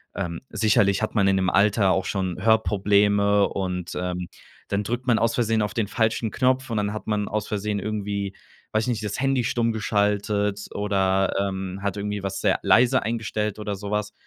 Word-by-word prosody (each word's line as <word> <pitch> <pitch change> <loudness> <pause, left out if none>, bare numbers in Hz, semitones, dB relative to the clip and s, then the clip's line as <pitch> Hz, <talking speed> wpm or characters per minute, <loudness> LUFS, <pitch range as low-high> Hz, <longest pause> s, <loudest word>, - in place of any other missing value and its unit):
ähm 85 -4 -4
sicherlich 105 -2 +2
hat 110 - -2
man 100 -3 +3
in 95 - +3
dem 95 -1 +1
Alter 100 0 +3
auch 95 0 +1
schon 95 -3 -2
Hörprobleme 105 -2 +3
und, 90 -2 -3
ähm, 90 0 -3 0.4
dann 100 +1 0
drückt 120 +4 -3
man 120 -3 +3
aus 115 0 +1
Versehen 115 -3 +1
auf 105 - -3
den 115 -4 -1
falschen 110 +1 0
Knopf 130 +1 +1
und 115 - -2
dann 105 0 -1
hat 110 - -7
man 105 -1 0
aus 105 0 -2
Versehen 105 0 -2
irgendwie 100 -1 -3 0.4
weiß 110 +1 +1
ich 125 - -2
nicht, 110 -3 -2
das 105 +1 -3
Handy 135 -1 +1
stumm 115 0 0
geschaltet 105 -1 0
oder, 95 -1 +1
ähm, 95 -1 -3
hat 100 0 -2
irgendwie 105 0 -3
was 95 0 -3
sehr - - +2
leise 125 +2 +4
eingestellt 110 -2 -2
oder 105 -1 -4
so 100 +1 -7
was. 105 0 -2
105 Hz, 195 wpm, -24 LUFS, 100-110 Hz, 0.4 s, leise